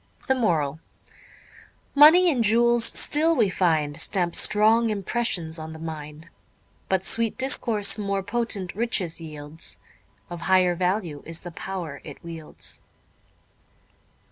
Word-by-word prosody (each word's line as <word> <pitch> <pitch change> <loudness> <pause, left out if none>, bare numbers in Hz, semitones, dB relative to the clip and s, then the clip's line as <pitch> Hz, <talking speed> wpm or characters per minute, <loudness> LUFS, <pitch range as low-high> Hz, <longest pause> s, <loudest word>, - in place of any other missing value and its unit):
The 265 - +3
Moral 160 - -1 1.2
_Money 330 +5 +7
and 245 -5 0
jewels 235 +2 +4
still, 320 +3 +2
we 220 -8 +2
find, 160 -5 0
Stamp 175 -4 -1
strong 220 +2 +3
impressions 195 -6 -2
on 160 0 -8
the - - -10
mind. 155 0 -8 0.6
But 190 -1 0
sweet 230 +2 +1
discourse 220 -6 +3
more 200 -1 -2
potent 205 -3 -2
riches 195 -7 -1
yields; 155 0 -6 0.5
Of 175 -2 -8
higher 185 -1 +4
value 180 -4 -2
is 165 0 -4
the 175 - -9
pow'r 170 -4 -7
it 145 - -10
wields. 165 -2 -7
190 Hz, 120 wpm, -24 LUFS, 160-230 Hz, 1.2 s, Money